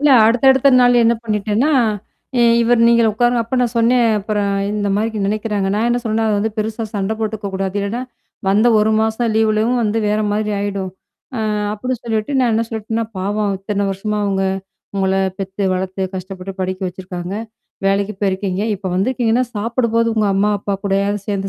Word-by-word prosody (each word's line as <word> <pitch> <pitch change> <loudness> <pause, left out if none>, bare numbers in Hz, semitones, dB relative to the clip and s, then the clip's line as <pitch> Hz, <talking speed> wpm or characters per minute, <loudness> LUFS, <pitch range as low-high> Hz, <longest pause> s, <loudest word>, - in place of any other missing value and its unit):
இல்ல. 295 0 +4 0.2
அடுத்த, 235 +3 +2
அடுத்த 265 +1 +4
நாள் 245 -1 +5
என்ன 235 +1 +4
பண்ணிட்டேன்னா, 215 +7 0 0.7
இ - - +4 0.2
இவரு 235 0 +3
"நீங்களே 235 -1 +4
உட்காருங்க." 240 +1 +2
அப்ப 255 +3 -3
நான் 240 -1 0
சொன்னேன். 235 +1 +4
அப்புறம் 205 0 -1 0.2
இந்த 205 -1 -1
மாதிரி 220 +1 -1
நெனனைக்கிறாங்க. 210 -1 -1
நான் 220 +3 +1
என்ன 240 - +1
சொன்னேன்னா, 225 0 0
அ - - +2
அத 210 - +2
வந்து 220 +2 0
பெருசா 220 +1 -2
சண்ட 200 +2 -1
போட்டுக்கக்கூடாது. 200 -3 -3
இல்லன்னா, 200 +5 -2 0.5
வந்த 210 +4 +3
1 215 +1 +3
மாசம் 220 +1 0
லீவுலயும் 220 +2 +2
வந்து 220 +1 0
வேற 210 +1 +1
மாரி 215 +1 -1
ஆயிடும். 200 -2 -3 0.5
அ - - -2 0.4
அப்டி 255 +5 -3
சொல்லிட்டு 220 +2 -2
நான் 250 -2 +3
என்ன 225 +1 +1
சொல்லிட்டேன்னா, 225 0 -3
பாவம் 205 +1 -1
இத்தன 200 +1 -2
வருஷமா 210 +2 -3
அவுங்க 195 -1 0 0.5
உங்கள, 190 -1 +1 0.2
பெத்து 195 +1 -4
வளர்த்து 190 +1 -3
கஷ்டப்பட்டு 185 +1 -6
படிக்க 185 +1 -2
வச்சிருக்காங்க. 180 0 -7 0.5
வேலைக்கு 200 +1 +1
போயிருக்கீங்க. 190 0 -1
இப்ப 195 0 -7
வந்திருக்கீங்கன்னா, 235 +3 +1
சாப்பிடும்போது 230 +1 +1
உங்க 215 -2 +2
அம்மா, 205 +2 +2
அப்பா 200 0 -2
கூடயாவது 200 +1 0
சேர்ந்து 195 -1 -1
210 Hz, 170 wpm, -18 LUFS, 195-230 Hz, 0.7 s, நாள்